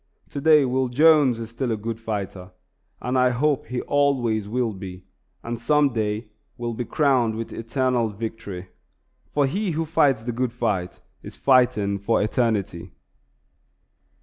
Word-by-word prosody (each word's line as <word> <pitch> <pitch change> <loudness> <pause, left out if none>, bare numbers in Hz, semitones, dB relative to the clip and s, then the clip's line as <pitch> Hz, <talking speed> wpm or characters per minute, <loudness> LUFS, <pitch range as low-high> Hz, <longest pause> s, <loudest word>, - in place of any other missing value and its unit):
Today 150 0 +4
Will 130 +1 0
Jones 145 -2 +4
is 115 0 -7
still 120 +1 -2
a 110 - 0
good 115 +1 -5
fighter, 100 -4 -5 0.5
and 125 +1 -2
I 125 0 +4
hope 140 +3 0
he 125 +1 -3
always 125 -7 +1
will 120 -1 -1
be, 95 -1 -9 0.4
and 115 0 -5
some 150 +1 +3
day 110 0 -2 0.3
will 120 -1 -3
be 120 +2 -4
crowned 130 -7 +2
with 115 0 -5
eternal 120 0 0
victory; 100 -4 -6 0.6
for 145 -1 +2
he 195 +9 -1
who 165 - 0
fights 145 -7 +2
the 120 - -2
good 120 0 -2
fight 105 -7 -2 0.2
is - - -10
fighting 120 -7 +3
for 105 +4 +1
eternity. 105 -6 -1
120 Hz, 150 wpm, -24 LUFS, 110-130 Hz, 0.6 s, Today